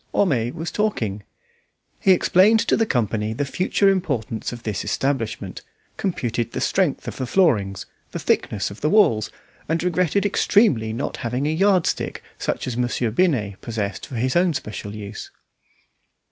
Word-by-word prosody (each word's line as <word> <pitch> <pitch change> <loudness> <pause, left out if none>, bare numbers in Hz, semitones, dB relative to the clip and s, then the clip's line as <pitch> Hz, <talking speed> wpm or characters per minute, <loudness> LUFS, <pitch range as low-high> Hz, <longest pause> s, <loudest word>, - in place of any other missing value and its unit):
Homais 125 - +2
was 165 +2 -5
talking. 115 - -1 0.8
He 190 - +4
explained 190 +4 +5
to - - +2
the 225 - +1
company 110 - 0
the 140 +5 -2
future 185 +7 +1
importance 140 - 0
of 120 -1 -8
this 105 -4 -2
establishment, 135 -5 -2 0.3
computed 120 - -2
the - - -2
strength 185 -7 0
of - - -5
the 130 - -3
floorings, 110 - +2 0.2
the - - -5
thickness 100 -1 0
of 100 - -11
the 150 - +2
walls, 135 - +4 0.4
and 165 +1 0
regretted 180 +2 +1
extremely 185 - +3
not 120 +5 -3
having 125 +3 -2
a 150 - +1
yard 190 0 +3
stick - - -2 0.2
such - - -2
as 125 - -3
Monsieur 120 -1 0
Binet 110 - +1
possessed 105 -4 -4
for 130 - -8
his 125 +2 0
own 175 -2 +3
special 105 -4 -5
use. 105 0 -7
130 Hz, 160 wpm, -22 LUFS, 110-180 Hz, 0.8 s, explained